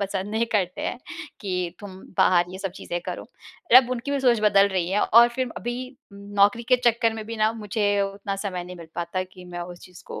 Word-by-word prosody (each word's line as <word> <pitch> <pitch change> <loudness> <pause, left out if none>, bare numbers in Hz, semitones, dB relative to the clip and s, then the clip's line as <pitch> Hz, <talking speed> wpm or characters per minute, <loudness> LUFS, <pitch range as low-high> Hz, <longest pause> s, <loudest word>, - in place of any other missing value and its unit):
पसंद 200 0 -3
नहीं 225 +2 0
करते 185 -4 0
हैं, - - -3 0.4
कि 180 -4 -3
तुम 200 -3 -9 0.2
बाहर 175 -1 +4
ये 185 - -8
सब 195 0 -3
चीज़ें 175 - -4
करो। - - -5 0.5
र - - +11
अब 255 -1 +6
उनकी 255 +2 -3
भी 280 -1 0
सोच 245 -4 +3
बदल 200 -2 +5
रही 185 -3 -1
है 205 +2 +2
और 235 +2 +6
फिर 255 +1 -2
अभी 240 +1 -3 0.4
उम, 200 - -12 0.2
नौकरी 205 +4 +4
के 255 - +6
चक्कर 230 -1 +3
में 220 -1 -6
भी 230 +1 -5
ना, 215 0 +3
मुझे 205 -2 0
उतना 195 0 -4
समय 190 -3 -4
नहीं 180 0 -9
मिल 165 -2 -11
पाता, 175 +2 -2
कि, 185 0 -13
मैं 175 -1 -7
उस 175 0 -8
चीज़ 180 -2 -14
को - - -7
200 Hz, 235 wpm, -24 LUFS, 185-230 Hz, 0.5 s, र